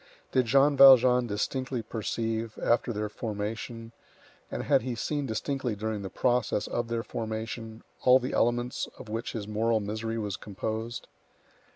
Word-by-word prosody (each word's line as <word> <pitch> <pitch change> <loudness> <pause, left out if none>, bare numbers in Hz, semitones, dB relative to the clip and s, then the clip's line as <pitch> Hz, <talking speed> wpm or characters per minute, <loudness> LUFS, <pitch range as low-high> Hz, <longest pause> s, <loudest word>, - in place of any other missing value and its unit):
Did 130 -2 +2
Jean 140 +4 +4
Valjean 125 -2 +7
distinctly 125 +3 -2
perceive, 115 0 -3
after 120 0 +1
their 105 -1 -2
formation, 110 +2 -5 0.6
and - - -4
had - - +3
he 125 +1 -3
seen 145 +4 -2
distinctly 125 +1 -2
during 110 0 -3
the 95 - -5
process 120 -1 +1
of 120 -1 -2
their 115 0 -2
formation, 110 0 -5 0.2
all 125 0 +7
the 130 0 -4
elements 120 +1 0
of 110 - -10
which 115 +2 -4
his 105 -3 -5
moral 110 +1 +1
misery 110 +2 -3
was 105 -4 -3
composed? 110 +3 -5
115 Hz, 150 wpm, -28 LUFS, 110-125 Hz, 0.6 s, Valjean